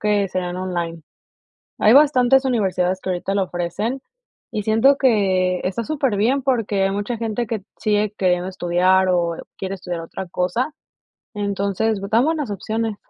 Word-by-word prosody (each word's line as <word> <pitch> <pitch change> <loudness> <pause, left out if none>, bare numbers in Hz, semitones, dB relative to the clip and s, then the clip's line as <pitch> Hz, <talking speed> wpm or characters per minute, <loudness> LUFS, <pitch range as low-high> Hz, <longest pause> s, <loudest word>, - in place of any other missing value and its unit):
que 210 -1 +2
serían 180 -1 -3
online. 175 -3 -3 0.8
Hay 215 - +5
bastantes 270 -2 +5
universidades, 190 -7 0
que 185 - -4
ahorita 185 +2 -2
lo 195 - +2
ofrecen, 190 +9 -3 0.5
y 210 - -3
siento 225 +7 +4
que 190 -7 +2
está 195 +5 -2
superbién, 270 -3 +1
porque 225 -7 0
hay 195 - +1
mucha 205 +4 -2
gente 230 +1 -2
que 215 -3 -3 0.2
sigue 210 -1 +1
queriendo 180 -1 +1
estudiar, 185 +1 +2
o 170 -2 +1 0.2
quiere 190 0 -4
estudiar 175 -2 -5
otra 175 +3 -7
cosa, 185 - -1 0.6
entonces 200 +1 -1
dan 230 +4 +4
buenas 310 -6 -1
opciones. 220 +2 -3
200 Hz, 145 wpm, -21 LUFS, 185-230 Hz, 0.8 s, Hay